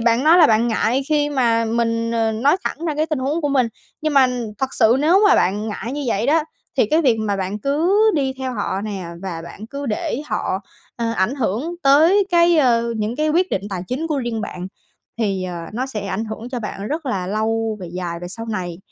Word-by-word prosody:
bạn 235 +3 +2
nói 330 +3 +7
là 320 - +8
bạn 225 +2 +3
ngại 240 +4 +1
khi 295 -1 +2
mà 235 -5 +2
mình, 230 0 0
ờ, 225 -1 +1
nói 275 +10 +3
thẳng 325 - -3
ra 305 - -1
cái 310 +2 0
tình 310 -4 -2
huống 285 +6 -1
của 290 - 0
mình. 260 -4 +2 0.3
Nhưng 310 -2 -1
mà 265 -2 +7 0.3
thật 265 0 -2
sự 230 +1 +4
nếu 350 +7 +4
mà - - +6
bạn 205 +4 +1
ngại 225 +4 -5
như 290 0 -3
vậy 225 +1 0
đó, 315 +2 +3 0.3
thì - - +4
cái 320 +2 +3
việc 245 -5 +4
mà 205 -2 -1
bạn 195 +2 -3
cứ 310 - +1 0.2
đi 270 -3 0
theo 260 -1 -3
họ 200 -2 -2
nè 200 -4 -5 0.2
và 170 -4 -5
bạn 210 +5 -9
cứ 280 +3 -6
để 235 +5 -2
họ, 190 - -2 0.4
ơ, 230 -1 -1
ảnh 220 +5 0
hưởng 270 - -2
tới 325 +9 +5
cái, 340 -1 +5
ơ, 235 -4 +3
những 215 +3 -2
cái 305 0 +1
quyết 360 +4 +2
định 195 - -1
tài 180 -2 -3
chính 285 +6 -2
của 300 -3 -1
riêng 235 -3 -2
bạn 180 -3 -5 0.5
thì, 195 -4 0
ờ, 180 -1 -5 0.2
nó 255 +4 -2
sẽ 210 -6 -5
ảnh 195 +3 -2
hưởng 220 +2 -6
cho 245 - -2
bạn 205 -1 -5
rất 310 -1 -3
là 190 -7 -2
lâu 220 +2 -1
về 180 - -6
dài 175 -2 -4
về 175 - -6
sau 225 +4 -7
này. 180 -5 -4
235 Hz, 235 wpm, -20 LUFS, 210-290 Hz, 0.5 s, là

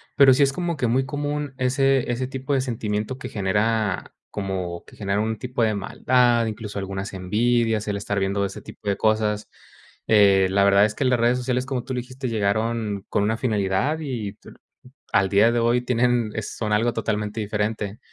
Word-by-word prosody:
pero 135 -2 +7
sí 140 +2 +4
es 135 - +2
como 170 +1 -2
que 125 -4 0
muy 130 +3 +1
común 145 0 -3
ese 135 0 +2
ese 120 +2 -1
tipo 135 +1 -3
de 135 - +2
sentimiento 110 -1 -3
que - - -7
genera 105 0 0 0.2
como 95 -4 -4
que - - -16
genera 100 0 -1
un 110 0 -1
tipo 125 +1 -4
de 110 -1 +3
maldad, 120 +3 +2
incluso, 105 -2 -5
algunas 95 +1 -5
envidias, 110 +3 +1
el 100 - -1
estar 100 0 -3
viendo 100 +1 0
ese - - -6
tipo 105 - -12
de 100 - +2
cosas. 110 -1 0 0.6
Eh, 100 -3 +5
la 100 +1 +3
verdad 100 +1 +5
es 105 - -3
que - - -1
las 125 -2 +2
redes 120 +2 +3
sociales, 125 0 -1
como 130 -2 -3
tú 130 - -5
lo 125 - -1
dijiste, 130 +1 -6
llegaron 110 -1 -1
con 100 - +1
una 110 +2 +1
finalidad, 105 +6 0
y 120 -9 -4
t - - -16 0.6
al 95 -1 +3
día 105 +4 +5
de 120 - +1
hoy 120 +1 +3
tienen 120 -2 +1
es 110 - -5
son 105 -2 -1
algo 115 +3 +2
totalmente 105 -1 -2
diferente. 105 +1 -2
110 Hz, 195 wpm, -23 LUFS, 100-125 Hz, 0.6 s, pero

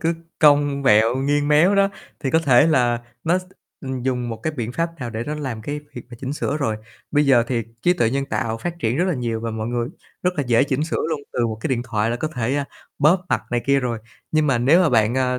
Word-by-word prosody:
cứ 165 -1 +1 0.2
cong 145 -2 +4
vẹo 115 0 +4
nghiêng 145 +2 +1
méo 165 +7 +5
đó 195 0 +4 0.3
thì 135 - -1
có 160 - +4
thể 140 -4 +5
là 120 -6 +2 0.2
nó 175 +3 +3
s - - -8 0.4
ừm, 130 -2 -5
dùng 125 -2 -1
một 115 - -4
cái 155 - -1
biện 120 -4 -4
pháp 165 +3 -1
nào 120 -2 -4
để 115 +1 -4
nó 150 - -3
làm 130 -7 -5
cái 145 +4 -4
việc 120 - -7
mà 120 - -9
chỉnh 135 +1 -3
sửa 145 0 -2
rồi. 115 -7 -1 0.3
Bây 145 -1 +2
giờ 120 -4 +5
thì 120 -3 -1 0.2
trí 175 - +4
tuệ 115 -10 +1
nhân 140 +1 -1
tạo 115 -4 -2
phát 175 +3 -5
triển 115 -2 0
rất 175 - +2
là 185 - 0
nhiều 115 -4 -2
và 115 - -3
mọi 110 0 -4
người 120 0 -1 0.3
rất 180 - +2
là 145 - +1
dễ 120 +1 +4
chỉnh 140 +2 -1
sửa 160 - -2
luôn, 155 -3 -2
từ 120 - +1
một 110 -1 -3
cái - - -2
điện 120 -2 0
thoại 115 -2 -1
là 120 - -1
có 155 - -2
thể, 125 -3 -2
a, 145 - 0 0.3
bóp 175 +6 +3
mặt - - +1
này 120 0 +1
kia 140 0 +3
rồi. 120 -3 -2 0.3
Nhưng 155 -1 +3
mà 135 -4 +2
nếu 140 +9 +5
mà 170 - +3
bạn, 110 -1 +2
ờ, 125 -1 +1
130 Hz, 270 wpm, -22 LUFS, 120-150 Hz, 0.4 s, méo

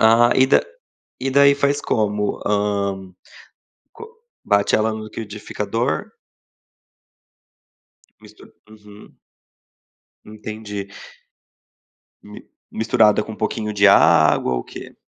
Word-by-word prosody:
Ah, 115 +2 +5
e 130 - +4
da - - +4 0.6
e 135 - -2
daí 140 +1 +5
faz 140 0 0
como? 105 -1 -1
Hã 100 -1 -1 1.0
co 450 - -11 0.4
bate 100 0 +2
ela 110 0 0
no 110 0 -7
liquidificador? 105 -1 -4 2.1
Mistura 105 0 -18 0.2
uhum. 105 -1 -16 1.1
Entendi. 105 -2 -8 1.4
Mi 105 0 -12 0.3
misturada 110 -1 +2
com 110 - -9
um 105 - -10
pouquinho 105 -1 -3
de 100 0 +3
água? 65 -8 +4
Ou - - -2
o - - -12
quê? - - -11
105 Hz, 105 wpm, -20 LUFS, 105-110 Hz, 2.1 s, Ah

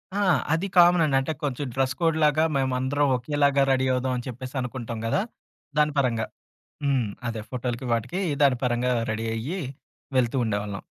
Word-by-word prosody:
ఆ! - - 0 0.3
అది 165 +5 0
కామన్ 175 -1 +7
అండి. 140 -3 +1
అంటే, 135 +4 -2
కొంచెం 145 0 -2
డ్రెస్ 130 -1 +1
కోడ్ 165 -2 +2
లాగా. 150 +1 +4
మేమందరం 130 +2 +1
ఒకేలాగా 140 +2 +2
రెడీ 130 0 +2
అవుదాం. 130 0 0
అని 120 - -6
చెప్పేసి 130 +2 -8
అనుకుంటాం 120 -2 -5
కదా! 115 - +1 0.6
దాని 150 0 +3
పరంగా. 115 -5 0 0.6
హ్మ్. 135 -5 +2 0.2
అదే 115 -2 -4
ఫోటోలకి 125 0 -3
వాటికి 125 - -2 0.2
దాని 135 -3 +4
పరంగా 125 +1 +1 0.2
రెడీ 110 +1 -3
అయ్యి. 150 +12 -3 0.6
వెళ్తూ 125 +1 +2
ఉండేవాళ్ళం. 100 -2 -3
130 Hz, 160 wpm, -25 LUFS, 120-145 Hz, 0.6 s, కామన్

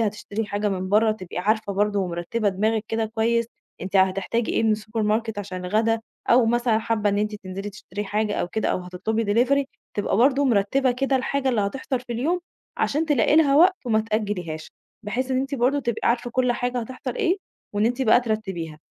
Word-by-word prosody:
هتشتري 215 0 -2
حاجة 205 +1 -1
من 185 -1 -2
برّا 215 +2 +4
تبقي 185 -5 -7
عارفة 210 +2 0
برضه 205 +1 +1
ومرتّبة 185 +4 -1
دماغِك 215 +3 0
كده 225 0 0
كويس 230 +1 +1 0.3
أنتِ 195 +1 -2
هتحتاجي 195 +5 +1
إيه - - +1
من 220 -1 +3
السوبر 215 +1 -3
ماركت 220 0 0
عشان 185 -2 -5
الغدا 220 +4 +1 0.3
أو 240 -1 +6
مثلًا 240 -1 +2
حابّة 220 -2 0
إن 200 - 0
أنتِ 210 0 -1
تنزلي 195 0 -6
تشتري 205 0 -6
حاجة 210 +1 -1
أو 175 - -1
كده 220 +2 -1
أو - - +1
هتطلبي 185 +5 -2
دليفري 255 +6 +2 0.3
تبقى 200 -1 0
برضه 270 +4 +4
مرتّبة 250 +3 +2
كده 270 +1 +1
الحاجة 270 +1 -1
اللي 235 -5 +2
هتحصل 255 +5 -2
في 245 -1 -7
اليوم 320 +10 0 0.4
عشان 310 +3 +1
تلاقي 295 0 +3
لها 285 -3 +5
وقت 370 +4 +6
وما 220 -2 +3
تأجّليهاش، 205 -8 -3 0.3
بحيث 250 +5 -2
إن 260 0 +2
أنتِ 275 +1 -3
برضه 265 +3 +2
تبقي 235 -3 -1
عارفة 240 +1 0
كل 250 0 +2
حاجة 245 +1 -2
هتحصل 255 +3 -6
إيه، 385 -4 +2 0.4
وإن 210 +2 +2
أنتِ 245 +3 0
بقى 230 0 +5
ترتّبيها 190 -9 -3
220 Hz, 195 wpm, -24 LUFS, 205-245 Hz, 0.4 s, أو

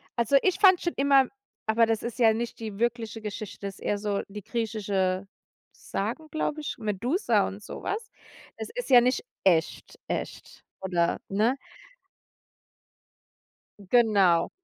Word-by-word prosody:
also, 235 +3 +3
ich 375 -2 +1
fand 375 -3 +7
schon 345 - -1
immer 275 -1 +5 0.4
aber 225 +1 +4
das 225 -1 -1
ist 235 +1 -5
ja 225 -2 +6
nicht 235 +1 -4
die 215 -3 -6
wirkliche 230 -1 -2
Geschichte, 210 -1 -6
ist 195 - -9
eher 205 - -1
so 205 -1 -1
die 205 0 -9
griechische 200 -5 -1 0.4
Sagen, 235 +11 -4
glaube 310 0 -2
ich, 300 - -5
Medusa 220 - +1
und 200 +2 -8
so - - -8
was. 435 +1 -4 0.5
Es - - -5
ist - - -4
ja 250 -2 +9
nicht 250 +2 +1 0.2
echt 165 -4 +1
echt, - - -5 0.2
oder, 175 -3 0
ne? 220 +7 +2 2.3
Genau, 200 -8 +4
225 Hz, 140 wpm, -27 LUFS, 200-250 Hz, 2.3 s, ja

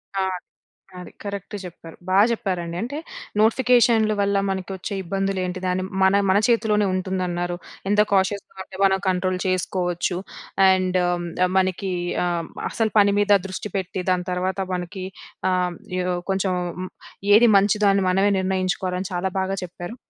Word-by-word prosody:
ఆ! 195 - +1 0.8
అది 180 - -10
కరెక్ట్ 200 0 -6
చెప్పారు. 165 -2 -10
బా 185 - +2
జెప్పారండి. 180 -7 -2
అంటే 250 +7 -4 0.4
నోటిఫికేషన్లు 230 -1 +4
వల్ల, 200 0 +2
మనకి 190 -1 -3
వచ్చే 195 +2 -5
ఇబ్బందులు 195 +2 -2
ఏంటి 180 0 -4
దాన్ని 180 0 0 0.2
మన 190 +1 +5
మన 190 - +5
చేతిలోనే 215 -3 +2
ఉంటుందన్నారు. 180 -2 -2 0.3
ఎంత 205 +1 +3
కాషియస్‌గా 195 +1 0
ఉంటే 190 - -12
మనం 190 0 +4
కంట్రోల్ 185 0 0
చేసుకోవచ్చు. 180 -1 -1 0.5
అండ్ 185 -1 +2 0.6
మనకి 185 0 0 0.3
ఆహ్, 170 -2 -2 0.2
అసలు 220 -2 -1
పని 200 0 +5
మీద 205 0 +5
దృష్టి 195 +2 -6
పెట్టి 185 -1 -3
దాని 180 -1 0
తర్వాత 185 +2 -1 0.2
మనకి 180 +2 -5 0.5
ఆహ్, 185 0 +2
హ్మ్, 175 - -10 0.2
ఏదో 180 0 0 0.2
కొంచెం 190 0 0 0.8
ఏది 225 +3 +7
మంచిదో 205 +1 +3
అని 195 -1 +2
మనమే 195 +2 +3
నిర్ణయించుకోవాలని 185 0 -1
చాలా 180 +2 -1
బాగా 190 +1 -1
చెప్పారు. 175 +5 -8
190 Hz, 140 wpm, -23 LUFS, 180-200 Hz, 0.8 s, ఏది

